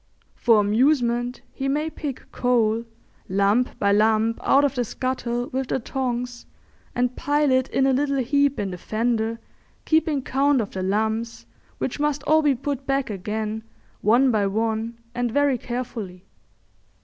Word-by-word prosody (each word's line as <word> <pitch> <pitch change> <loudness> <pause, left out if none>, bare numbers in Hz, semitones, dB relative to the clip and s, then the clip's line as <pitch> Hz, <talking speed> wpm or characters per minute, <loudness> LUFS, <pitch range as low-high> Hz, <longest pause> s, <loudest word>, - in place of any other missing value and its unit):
For 230 -3 +4
amusement 240 +2 +2
he 270 - -4
may 300 +3 0
pick 285 -4 -6
coal 230 -2 +1 0.4
lump 200 +6 +2
by 200 -1 +2
lump 220 +2 +3
out 275 +1 +4
of 280 - 0
the 250 -3 0
scuttle 245 0 -3
with 265 0 -2
the - - 0
tongs 245 -1 -3 0.5
and 250 0 0
pile 290 -1 +1
it 260 0 +3
in 270 - +2
a 270 - +3
little 280 +1 +1
heap 280 +2 +2
in 195 -2 -2
the 180 - -7
fender, 225 +2 -1 0.5
keeping 315 -3 +2
count 275 +1 +2
of 215 - -2
the 190 - -4
lumps, 220 +4 -1 0.3
which 265 - -3
must 295 -1 0
all 310 +1 +4
be 290 -3 +3
put 275 +1 -4
back 275 -4 0
again, 215 +3 -3 0.4
one 245 +5 +4
by 210 -3 +2
one 225 +2 -1 0.2
and 245 0 -1
very 285 -1 +2
carefully. 225 -7 -5
245 Hz, 155 wpm, -24 LUFS, 220-270 Hz, 0.5 s, For